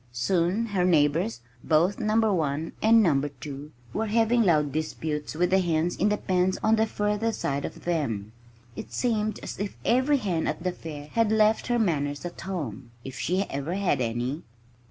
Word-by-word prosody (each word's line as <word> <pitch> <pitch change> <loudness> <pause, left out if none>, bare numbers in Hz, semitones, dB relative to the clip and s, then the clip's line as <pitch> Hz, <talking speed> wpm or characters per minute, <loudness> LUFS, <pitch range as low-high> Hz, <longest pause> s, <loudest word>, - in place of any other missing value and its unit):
Soon 175 - +1
her 200 -5 0
neighbors 145 -8 +2 0.2
both 170 +7 +2
Number 220 -1 +2
1 155 -2 -1
and 225 0 +6
Number 145 -5 +2
2 145 +1 -9 0.2
were 220 +1 -1
having 230 +2 +3
loud 155 -8 +3
disputes 155 0 -3
with 175 +3 +1
the 190 - +5
hens 170 -1 0
in 205 - +2
the 210 - +1
pens 185 -1 +1
on 220 +1 +4
the 220 0 +2
further 210 +2 0
side 140 -9 -2
of - - -8
them. 115 -12 -1 0.4
It - - -8
seemed 215 -4 0
as - - -6
if 205 0 -4
every 260 +4 +3
hen 185 -9 -1
at - - -3
the 180 - 0
fair 150 -4 -8
had 230 -2 +2
left 220 0 +3
her 240 -1 +1
manners 145 -8 0
at 175 - -7
home 140 - -5
if 130 -1 -8
she 185 +3 0
ever 150 0 -4
had 195 -9 +1
any. 120 +6 -2
175 Hz, 180 wpm, -26 LUFS, 145-210 Hz, 0.4 s, and